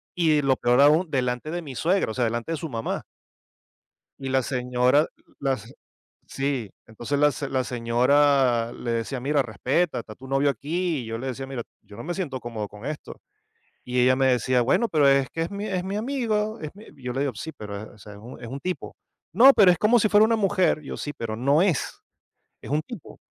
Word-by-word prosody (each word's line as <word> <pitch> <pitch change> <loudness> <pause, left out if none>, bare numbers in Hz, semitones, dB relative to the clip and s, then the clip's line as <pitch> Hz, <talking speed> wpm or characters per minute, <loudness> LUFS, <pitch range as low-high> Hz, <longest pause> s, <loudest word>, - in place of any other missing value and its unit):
Y 155 -4 +3
lo 135 -2 +2
peor, 125 +1 +2
aún 155 +4 +5
delante 125 +2 -1
de 175 +1 -3
mi 140 -5 -9
suegra, 175 - +1
o - - -5
sea, 125 - -1
delante 120 +7 -2
de - - -2
su 160 +2 -5
mamá. 115 -3 -3 1.2
Y 135 - -4
la 130 -1 +2
señora, 125 +3 +2 0.3
la 135 -1 0
señ 115 +4 -13 0.5
Sí, 135 -6 -2 0.2
entonces 120 +6 -3
la 150 - +5
s 140 +2 -5
la 130 -1 0
señora 125 0 +2
le 120 - -4
decía: 115 +3 -2
"Mira, 140 +3 +1
respeta, 130 - -1
está 110 -2 -8
tu 130 +3 -13
novio 135 +1 +2
aquí", 160 +6 -1
y - - -7
yo 115 0 -4
le 130 - -6
decía: 130 +1 -4
"Mira, 135 -3 -5 0.2
yo 100 - -14
no 115 - -8
me 175 +1 -3
siento 150 -9 -3
cómodo 115 -4 -5
con 105 +5 -11
esto". 150 0 -6 0.7
Y 125 0 -3
ella 125 +1 +5
me 135 0 +2
decía: 125 0 +2
"Bueno, 230 - +2
pero 150 -7 +3
es 135 -1 +3
que 165 - -3
es 165 - -3
mi 200 +1 -4
es 185 -3 -2
mi 195 +2 -4
amigo 220 -3 -1
es 155 - -5
mi", 210 - -13
yo 125 -2 -5
le 135 - -1
digo: 140 -2 -1
"Sí, 160 - -6
pero, 105 0 -8
o - - -19
sea, 105 +1 -12
es 100 - -12
un 120 +4 -11
es - - -8
un 135 +4 -6
tipo". 180 +3 -4 0.4
"No, 255 +9 +8
pero 195 -7 +6
es 175 - -2
como 225 +6 +4
si 215 -1 +2
fuera 205 +1 +5
una 225 0 +3
mujer". 195 -6 +2
Yo: 145 - -7
"Sí, 145 - -5
pero 115 -6 -5
no 140 +6 +2
es, 180 -5 0 0.6
es - - -9
un 150 +1 +2
tipo". 215 - -11
135 Hz, 225 wpm, -25 LUFS, 125-165 Hz, 1.2 s, No